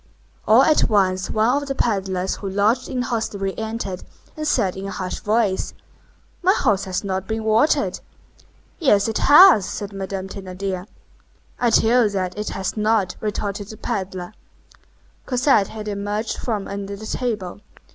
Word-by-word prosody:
All 225 +5 +7
at 310 +1 +3
once 185 -3 +1
one 240 +6 +2
of 285 - -7
the 275 - -2
pedlers 190 -6 -1
who 200 - -5
lodged 210 +6 +1
in 255 - -2
the - - -2
hostelry 205 -5 -2
entered, 220 -4 -4 0.3
and 305 0 -4
said 205 -10 +1
in 195 +1 -6
a - - -5
harsh 185 -1 -4
voice:— 210 -3 0 0.7
"My 370 +2 +4
horse 205 - +1
has 185 +1 -3
not 190 -1 -3
been 220 0 -2
watered." 220 +7 +2 0.8
"Yes, 210 - +3
it 220 - -1
has," 295 - +7
said 205 -1 -5
Madame 195 -1 -4
Thénardier. 190 -1 -5 0.7
"I 240 - +3
tell 235 +1 +4
you - - +2
that 185 -3 -3
it 210 +1 -3
has 190 -1 -3
not," 215 -3 +1
retorted 205 -1 -3
the 220 - -10
pedler. 190 -4 -4 0.9
Cosette 250 -5 +3
had 215 -1 -8
emerged 205 +2 -2
from 215 -5 -3
under 200 0 -5
the 215 +2 -9
table. 210 -6 -3
205 Hz, 160 wpm, -21 LUFS, 195-230 Hz, 0.9 s, All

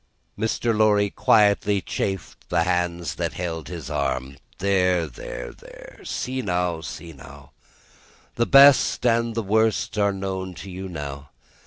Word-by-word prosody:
Mr. 110 +1 0
Lorry 105 -2 +3
quietly 105 -1 +3
chafed 95 0 -4
the 85 - +2
hands 90 -2 -1
that - - -2
held 80 -3 -4
his 85 -6 -7
arm. 65 -1 -2 0.2
"There, 90 -3 +2
there, - - -7
there! - - -14
See 130 +1 -3
now, 90 -5 -1
see 80 +2 -8
now! 70 +1 -14 0.8
The 120 - 0
best 140 -2 +6
and 115 -1 +2
the 115 - -1
worst 110 +1 +1
are 100 0 +3
known 95 -1 -4
to 95 - -9
you, 95 +1 -6
now. 70 -3 -7
95 Hz, 140 wpm, -23 LUFS, 80-105 Hz, 0.8 s, best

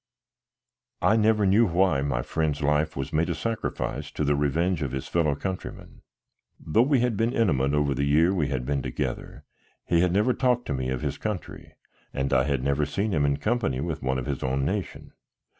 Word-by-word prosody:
I 110 - +4
never 110 -1 +3
knew 105 +4 +4
why 90 -4 +2
my 70 -4 -1
friend's 75 -3 -1
life 75 +2 +1
was 70 0 -5
made 80 +2 +1
a - - -1
sacrifice 115 -1 -3
to - - -2
the 75 0 +2
revenge 80 +5 0
of 70 -3 -3
his 65 - -4
fellow 75 -4 +1
countrymen. 95 +5 -6 0.6
Though 95 +9 +2
we 135 0 +3
had 120 -2 +1
been 115 +4 0
intimate 75 - +2
in 75 -1 +1
the 70 +2 -1
year 80 +6 +3
we 80 -7 0
had 65 -3 -3
been 70 0 -1
together, 65 -2 -5 0.4
he 85 - +2
had 90 -1 +2
never 105 +7 +2
talked 125 0 +1
to - - -2
me 65 -1 -2
of 65 -1 -2
his - - -3
country 105 -4 -6 0.4
and 70 0 -1
I 65 0 +3
had 70 -3 -1
never 70 +2 +1
seen 100 +9 -1
him 75 -5 +2
in 70 -1 +1
company 95 - -1
with - - -3
one 65 0 0
of 65 - -4
his - - -3
own 65 +1 -1
nation. 95 +4 -4
75 Hz, 205 wpm, -26 LUFS, 70-100 Hz, 0.6 s, I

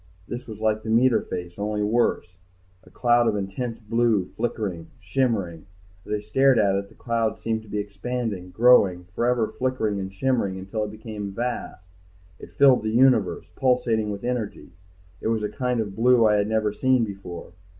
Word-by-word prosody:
This 120 +1 -6
was 110 -2 -8
like 110 0 +1
the 110 - -7
meter 120 +2 +4
face, 90 +1 -7
only 105 0 -1
worse. 105 -5 0 0.5
A - - -17
cloud 120 +5 +2
of 110 - +1
intense 105 +4 -4
blue, 115 -3 +1
flickering, 95 -7 -3
shimmering 95 -5 -1 0.4
As - - -7
I 105 -1 -1
stared 135 +5 +3
at 100 -3 +3
it 100 0 -2
the - - -20
cloud 115 -2 -1
seemed 110 -1 -2
to 110 - -17
be 105 +1 -4
expanding, 105 -1 -4
growing, 100 -5 +4
forever 120 0 +1
flickering 120 -6 0
and 95 0 -5
shimmering 100 -2 0
until 100 +3 -3
it 105 - -7
became 110 -2 -6
vast, 120 -4 -4 0.5
it - - -11
filled 135 -2 +5
the 110 - -2
universe, 130 +4 +3
pulsating 120 -5 +1
with 100 -1 -5
energy, 120 -4 -4 0.5
it - - -2
was 110 -1 0
a 105 - -1
kind 125 +2 -1
of 100 -3 -3
blue 120 0 +4
I 105 - +4
had 100 0 +1
never 110 -1 0
seen 130 +1 +2
before.... 95 -5 -7
110 Hz, 180 wpm, -24 LUFS, 100-120 Hz, 0.5 s, filled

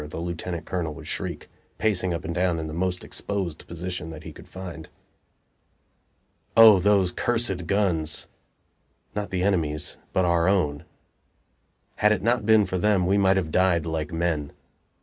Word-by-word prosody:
the - - -7
lieutenant 85 0 -4
colonel 85 -4 -3
would - - -10
shriek, - - -4 0.3
pacing 95 -4 +1
up 85 0 -3
and 85 - -3
down 90 -1 +1
in 80 - -3
the 80 - -6
most 90 +1 -1
exposed 95 -6 -4
position 85 -1 -5
that 80 -2 -9
he - - -8
could - - -14
find. 90 -4 -8 1.7
O 110 -4 +9
those 100 -1 +3
cursed 110 -8 -1
guns! 85 -6 +1 0.9
not 105 -1 -3
the 90 -1 -1
enemy's, 80 -6 -1
but 95 - +2
our 85 0 +3
own. 80 -5 0 1.1
Had 105 - +4
it 105 -3 0
not 115 -1 +1
been 110 -2 +6
for 95 0 -2
them, 100 -2 +2
we 100 +3 +3
might 95 0 +4
have 80 -5 -1
died 90 -2 +2
like 80 0 -3
men. 80 -3 -1
90 Hz, 160 wpm, -25 LUFS, 80-100 Hz, 1.7 s, O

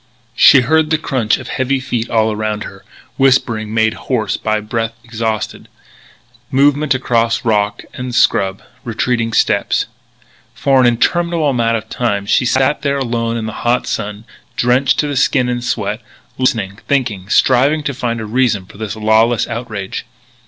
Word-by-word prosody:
She 135 - +7
heard 155 +4 +2
the 160 - +2
crunching 130 -8 0
of - - -10
heavy 130 +1 0
feet 120 -3 -3
all 110 -1 +2
around 105 0 -3
her, - - -11 0.3
whispering 120 -5 +2
made 110 0 +2
hoarse 115 -5 -2
by 110 0 -1
breath 115 +2 -3
exhausted, 110 -2 -4 0.8
movement 145 +1 +2
across 115 -3 0
rock 105 -2 0
and 125 -1 -5
scrub, 95 0 +2 0.2
retreating 115 0 -1
steps. - - +1 0.7
For 135 -1 +3
an 125 - +5
interminable 155 +4 +1 0.3
time 105 -5 -2
she 120 +4 +2
sat 130 +4 +1
there 140 -1 0
alone 115 -3 -1
in 110 - -3
the 110 - -5
hot 120 +1 +1
sun, 105 0 -4 0.3
drenched 125 +2 +2
to 150 - -2
the 145 - -3
skin 130 -1 +2
in 120 0 -2
sweat, 110 -2 -2 0.3
listening, 110 -6 -1
thinking, 115 -9 -1
striving 135 +7 +3
to 140 - -2
find 120 -3 -3
a 110 - -5
reason 110 -4 0
for 100 - -16
this 110 -1 -4
lawless 110 +2 +2
outrage. 110 -4 -5
120 Hz, 150 wpm, -16 LUFS, 110-130 Hz, 0.8 s, She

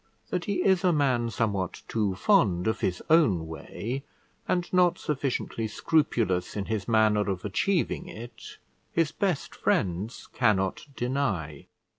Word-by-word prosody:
That 180 -2 -1
he 200 - 0
is 190 -1 +4
a 180 - +4
man 130 -6 +2
somewhat 100 -5 -2
too 105 -4 0
fond 100 - +3
of 110 - 0
his 90 -1 -1
own 135 - +4
way, 115 +10 -5 0.4
and 175 -1 0
not 180 -1 +4
sufficiently 135 -5 -2
scrupulous 110 - +1
in 100 -2 -2
his 105 -3 -3
manner 110 -2 +3
of 95 -1 -3
achieving 170 - 0
it, 120 +2 -10 0.3
his 165 -2 +1
best 190 -8 -1
friends 95 +6 -1
cannot 100 -2 +1
deny. 110 - -2
115 Hz, 135 wpm, -27 LUFS, 95-155 Hz, 0.4 s, is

